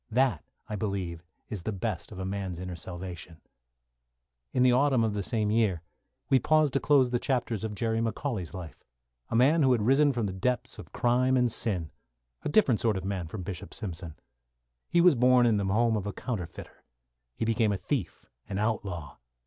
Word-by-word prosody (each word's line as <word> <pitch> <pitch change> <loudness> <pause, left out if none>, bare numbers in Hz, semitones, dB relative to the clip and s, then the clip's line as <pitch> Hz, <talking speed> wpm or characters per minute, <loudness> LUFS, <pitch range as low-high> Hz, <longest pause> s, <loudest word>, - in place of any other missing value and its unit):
That, 125 - +1 0.2
I 105 - -4
believe, 95 -5 -3 0.3
is 105 -5 -4
the 110 - -3
best 100 -2 -4
of 100 - -9
a 95 - -4
man's 95 -2 -3
inner 90 0 -5
salvation. 85 -2 -8 1.1
In 125 - +2
the 130 - +6
autumn 130 -2 +3
of 110 -2 0
the 105 - -2
same 105 0 0
year 105 -7 +1 0.4
we 135 - +4
paused 155 +1 +3
to 140 - +2
close 135 -4 +3
the 120 - +1
chapters 120 -5 -1
of 110 -2 -3
Jerry 115 +2 0
McCauley's 115 - -2
life, 90 -4 -9 0.5
a - - -2
man 140 +7 +5
who 130 -3 +5
had 115 -4 +1
risen 140 +5 +4
from 120 -4 -1
the 95 - -3
depths 125 +6 -2
of - - -11
crime 125 +2 +2
and 125 -2 +2
sin 90 -10 +1 0.5
a - - -3
different 145 - +4
sort 110 -4 +1
of 95 - -5
man 95 -4 -3
from 95 +3 -6
Bishop 95 -1 -7
Simpson. 85 -5 -6 0.7
He 170 - +4
was 175 -1 +7
born 125 -1 +5
in 115 -3 +3
the 100 - -1
home 110 +4 +2
of 105 -1 -2
a 100 - -3
counterfeiter. 90 -6 -6 0.5
He - - -2
became 110 -1 +2
a 100 - 0
thief, 110 - -3 0.2
an 95 - -3
outlaw. 100 -8 -2
110 Hz, 195 wpm, -28 LUFS, 95-125 Hz, 1.1 s, was